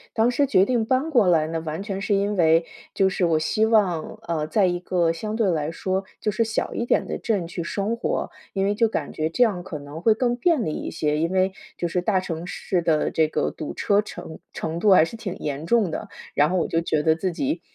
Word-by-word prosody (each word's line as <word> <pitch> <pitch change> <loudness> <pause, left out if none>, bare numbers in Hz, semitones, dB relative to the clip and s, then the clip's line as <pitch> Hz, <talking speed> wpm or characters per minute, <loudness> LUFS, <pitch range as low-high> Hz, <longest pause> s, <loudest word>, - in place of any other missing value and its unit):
当 230 +2 +3
时 280 +2 +2
决 190 -7 +4
定 240 -2 +1
搬 265 +5 +1
过 235 -9 +4
来 160 -3 +4
呢， 165 0 -3
完 160 +4 -4
全 195 -1 -4
是 200 0 +1
因 200 +1 0
为 165 -1 +4 0.3
就 195 - +3
是 185 - -2
我 160 -2 +2
希 215 +8 +1
望， 195 -8 +1
呃， 155 -2 -2
在 200 +3 +2
一 175 -1 0
个 175 -2 +1
相 215 +6 -4
对 215 -5 +2
来 155 -1 -1
说 190 +3 -2 0.2
就 210 - 0
是 230 +3 +1
小 225 0 -2
一 235 - -2
点 - - +1
的 - - -4
镇 205 -7 -1
去 170 0 -5
生 205 +6 -2
活， 235 - -2 0.2
因 195 0 0
为 205 - +2
就 230 +2 +3
感 155 -9 -4
觉 155 +1 -1
这 245 +9 +3
样 195 -6 0
可 170 -5 -6
能 145 +3 -9
会 220 +1 +4
更 240 0 +1
便 275 -2 +2
利 155 - -2
一 - - -4
些， 150 -1 -1
因 165 +3 0
为 190 0 +2 0.2
就 175 - -1
是 180 +1 -1
大 190 0 +2
城 170 -1 -5
市 180 -1 -2
的 160 -2 +1
这 160 -1 +2
个 - - -1
堵 155 - -6
车 205 0 +2
程 160 -6 -9
程 165 +1 -4
度 210 - +3
还 160 -3 +6
是 230 - -8
挺 205 -5 -5
严 145 0 -4
重 215 -7 +3
的， - - -5 0.2
然 145 +2 +3
后 185 - 0
我 170 - +1
就 165 - 0
觉 155 -2 0
得 160 0 +4
自 185 +2 -2
己 280 - -2
185 Hz, 270 characters per minute, -24 LUFS, 165-215 Hz, 0.3 s, 还